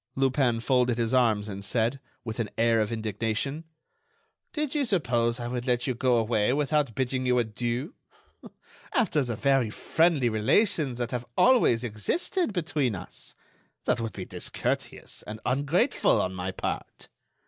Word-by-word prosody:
Lupin 130 -3 +2
folded 125 0 +2
his 115 0 0
arms 110 -5 +3
and 100 -1 -6
said, 115 +6 0 0.3
with 110 0 -5
an 110 -3 -1
air 115 -1 +3
of 105 - -1
indignation: 115 - -2 0.9
"Did 300 -4 -2
you 295 -2 +1
suppose 120 - +1
I 120 - -4
would 125 +1 -4
let 125 -1 +1
you 130 - 0
go 125 +1 +2
away 115 0 +2
without 145 -4 +1
bidding 130 0 -1
you 125 0 +3
adieu? 120 - -2 1.0
After 220 - +2
the 120 -4 -2
very 135 -2 +2
friendly 160 +3 +2
relations 130 - +2
that 120 -1 -3
have 125 -1 -4
always 235 - +4
existed 225 - -1
between 150 - -1
us! 90 0 -10 0.5
That - - +1
would 115 -2 -4
be 95 - -6
discourteous - - -3
and 110 +1 -6
ungrateful 145 - +2
on 95 - -1
my 90 0 -4
part." - - -5
125 Hz, 150 wpm, -27 LUFS, 115-140 Hz, 1.0 s, always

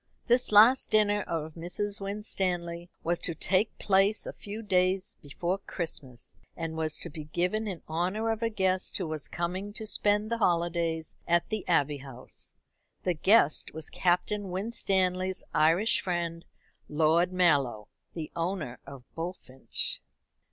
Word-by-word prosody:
This 245 0 +3
last 225 +6 +7
dinner 210 -1 +3
of 160 -1 -3
Mrs. 200 +5 -3
Winstanley 180 -4 -2
was 170 +1 0
to 170 - -1
take 195 +6 +1
place 195 +2 +2
a - - -5
few 210 +2 -7
days 185 -1 +1
before 175 +6 -2
Christmas, 140 -11 -6 0.2
and 165 -1 -4
was 160 -1 -1
to - - -4
be 155 -1 -7
given 180 +8 -1
in 185 -5 -5
honour 185 +8 0
of 225 0 -3
a 230 - +1
guest 190 -3 0
who 185 - -2
was 155 -2 -4
coming 185 +4 -3
to 220 - -7
spend 210 0 +1
the 235 - 0
holidays 170 -3 0
at 170 0 +2
the 215 -3 -3
Abbey 145 -4 +2
House. 135 -2 -11 0.5
The 180 - +1
guest 170 -3 +3
was 160 -1 -5
Captain 190 +3 0
Winstanley's 185 -2 0
Irish 165 +8 +3
friend, 170 -2 -3 0.4
Lord 160 +4 +3
Mallow, 140 - +2 0.3
the 160 -3 -5
owner 165 -7 -3
of 135 -2 -10
Bullfinch. 165 -6 -3
180 Hz, 145 wpm, -29 LUFS, 160-205 Hz, 0.5 s, last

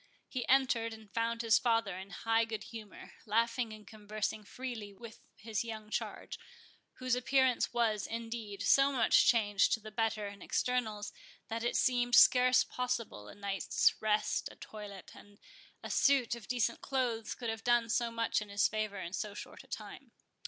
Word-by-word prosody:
He 255 -2 -4
entered, 240 -4 +3
and 215 -2 -16
found 230 0 -1
his 225 -1 +5
father 225 -5 +1
in 190 +1 -8
high 225 +4 +1
good 220 -2 -4
humour, 220 -3 -10 0.2
laughing 230 +2 +1
and 215 -1 -11
conversing 215 0 -4
freely 220 -3 -7
with 225 +2 -11 0.2
his 215 +1 -3
young 220 -2 -7
charge, - - -4 0.5
whose 255 -1 -2
appearance 255 0 +2
was, 225 -4 0
indeed, 225 -3 -5
so 275 +6 +5
much 240 -5 +4
changed 205 -4 +3
to - - +1
the 215 0 -10
better 220 -1 -1
in 200 0 -10
externals, 220 -5 -1 0.4
that 225 +1 -3
it 240 - 0
seemed 245 -1 +2
scarce 255 +1 +7
possible 240 - -3
a - - -11
night's 200 -3 +1
rest, 215 -1 0
a - - -14
toilet, 205 -4 -10
and 205 0 -16 0.5
a - - -5
suit 275 -5 +3
of 235 -4 -8
decent 245 -3 0
clothes, 245 -5 -1
could 235 -3 -3
have 225 0 -7
done 240 -1 +3
so 235 +1 +1
much 230 -1 0
in 210 - -8
his 200 -1 +3
favour 215 -2 -3
in 175 -1 -6
so 205 0 -3
short - - -9
a - - -21
time. - - -8
225 Hz, 175 wpm, -33 LUFS, 210-240 Hz, 0.5 s, scarce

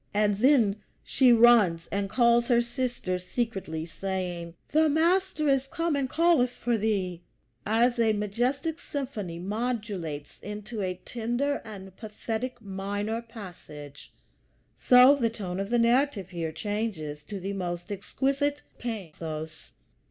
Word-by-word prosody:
And 205 -1 +2
then 235 -6 +4 0.3
she 260 -2 +4
runs 225 -8 +6
and 200 0 -1
calls 235 +1 +4
her 240 -2 +4
sister 240 -7 -2
secretly, 185 -6 -3
saying, 175 -2 -4
"The 315 +1 +4
Master 335 +1 +2
is 270 -1 +2
come 330 +1 -1
and 275 -2 -1
calleth 330 -6 +3
for 240 -1 -1
thee." 195 -5 -1 0.5
As 235 +3 +3
a 225 -1 +4
majestic 245 - -1
symphony 235 - -5
modulates 200 -7 -4
into 210 +2 -6
a 185 -1 -1
tender 240 +5 -1
and 195 -4 -10
pathetic 225 +3 -4
minor 205 +2 -3
passage, 175 - -11 0.6
so 250 +2 +7
the 245 -5 +1
tone 195 -5 -5
of 195 0 -3
the 240 - +2
narrative 235 - +2
here 165 -2 -3
changes 190 -8 -4
to 200 +5 -6
the 195 +2 -4
most 175 -1 -4
exquisite 275 +8 -1 0.2
pathos. 160 - -6
220 Hz, 130 wpm, -27 LUFS, 185-250 Hz, 0.6 s, so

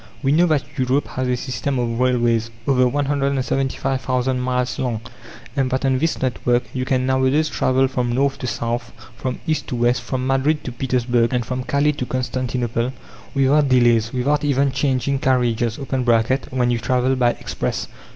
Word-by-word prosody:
We 135 - +2
know 170 +4 +4
that 155 -4 +2 0.2
Europe 130 +3 +1
has 130 0 -2
a 125 0 +1
system 130 +2 -3
of 120 -1 -1
railways, 120 -3 +2 0.2
over 130 -2 +4
175,000 135 -2 0
miles 125 0 -1
long, 120 -4 -1 0.5
and 135 -2 +1
that 130 +2 -1
on 130 -1 +2
this 160 +3 0
network 125 -1 +1
you 130 -1 -2
can 130 -2 +1
nowadays 130 +4 +2
travel 130 -2 +2
from 125 -2 -1
north 135 +3 +1
to 125 - -4
south, 120 +1 -3 0.2
from 130 - -4
east 155 -1 -1
to - - -3
west, 120 +1 +2
from 130 -1 -3
Madrid 135 +3 +1
to 125 - -5
Petersburg, 120 -1 0
and 120 -2 0
from 125 +1 -3
Calais 140 +3 +2
to 140 -4 -5
Constantinople, 125 -1 -2 0.4
without 140 +1 +3
delays, 120 -3 +4
without 145 +4 0
even 140 -1 +2
changing 135 0 0
carriages 120 -3 +1
(when 125 -1 +1
you 120 - 0
travel 125 +3 +1
by 120 -2 +2
express). - - -4
130 Hz, 165 wpm, -21 LUFS, 125-135 Hz, 0.5 s, know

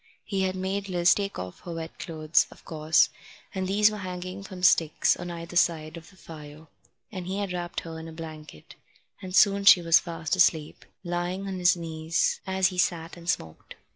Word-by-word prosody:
He 195 -2 -2
had 190 0 0
made 195 +1 -3
Liz 175 -1 +4
take 200 -1 -3
off 90 0 -7
her 175 -2 -8
wet 160 0 -7
clothes, 155 -2 +1
of - - -17
course, 155 0 +3 0.4
and 190 -1 -2
these 210 +2 +4
were 210 - -6
hanging 185 0 -6
from 185 -2 -10
sticks 165 -4 +4
on 175 0 -7
either 170 0 -7
side 160 -2 +1
of 165 -1 -11
the 190 - -20
fire, 155 -2 -11 0.5
and 185 -4 -6
he 190 +1 -3
had 200 -3 -3
wrapped 175 -1 -4
her 165 -1 -8
in 160 - -8
a - - -9
blanket, 155 - -10 0.5
and 185 -1 -5
soon 200 -1 +5
she 195 -2 +9
was 165 -1 +6
fast 165 0 -3
asleep, 160 -4 +1 0.2
lying 175 +2 -3
on 190 -1 -4
his 180 0 +4
knees 165 0 -1
as 190 0 +2
he 180 -2 -5
sat 165 -2 0
and 170 0 -8
smoked. 80 - -4
175 Hz, 200 wpm, -27 LUFS, 160-190 Hz, 0.5 s, she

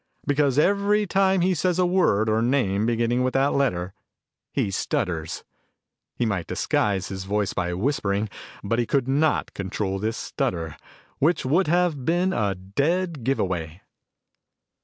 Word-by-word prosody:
Because 145 -2 +2
every 200 +5 +3
time 190 0 +2
he 185 +2 +3
says 180 +1 0
a 180 - +3
word 175 - +2
or 110 +1 +2
name 115 -5 +1
beginning 120 +1 +1
with 130 +1 0
that 135 +1 +3
letter, 90 -10 0 0.6
he 100 - -1
stutters. 85 -4 -2 0.7
He 120 - 0
might 95 -6 -2
disguise 100 -3 0
his 95 -1 -5
voice 105 0 -1
by 90 0 -1
whispering, 105 -2 0 0.4
but 115 +4 0
he 120 - 0
could 135 -3 +1
not 150 +4 +1
control 95 0 -3
this 110 +3 -2
stutter, 80 -3 -3 0.4
which 160 +1 +2
would 165 +8 +2
have 170 -4 +1
been 175 +5 +1
a 100 - 0
dead 145 - -1
give 135 +3 0
away." 85 -2 -3
120 Hz, 150 wpm, -24 LUFS, 100-160 Hz, 0.7 s, every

